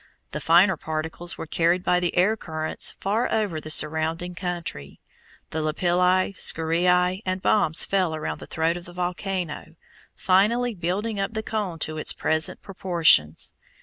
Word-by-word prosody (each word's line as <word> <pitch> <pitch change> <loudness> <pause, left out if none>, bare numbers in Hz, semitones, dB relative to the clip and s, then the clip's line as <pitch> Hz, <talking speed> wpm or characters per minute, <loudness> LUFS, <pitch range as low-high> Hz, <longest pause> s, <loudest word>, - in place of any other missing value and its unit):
The - - -4
finer 175 +2 +5
particles 160 +3 -4
were - - -5
carried 170 +3 +1
by 180 -1 +2
the 180 0 -2
air 195 +5 +4
currents 155 -6 -1
far 215 +5 0
over 200 -8 -1
the 155 - -8
surrounding 160 +3 0
country. 175 - -6 0.5
The 160 - -2
lapilli, 180 +4 +2
scoriæ, 180 +2 +2
and 185 0 -2
bombs 175 -5 +2
fell 185 -5 0
around 155 - -4
the - - -9
throat 165 +1 0
of 175 - -10
the 175 - -11
volcano, 180 -2 -4 0.4
finally 225 +6 +2
building 200 +4 -2
up 195 +3 -2
the 220 - -2
cone 210 -7 -3
to 155 0 -6
its - - 0
present 160 0 -1
proportions. 170 - +2
175 Hz, 150 wpm, -24 LUFS, 160-190 Hz, 0.5 s, finer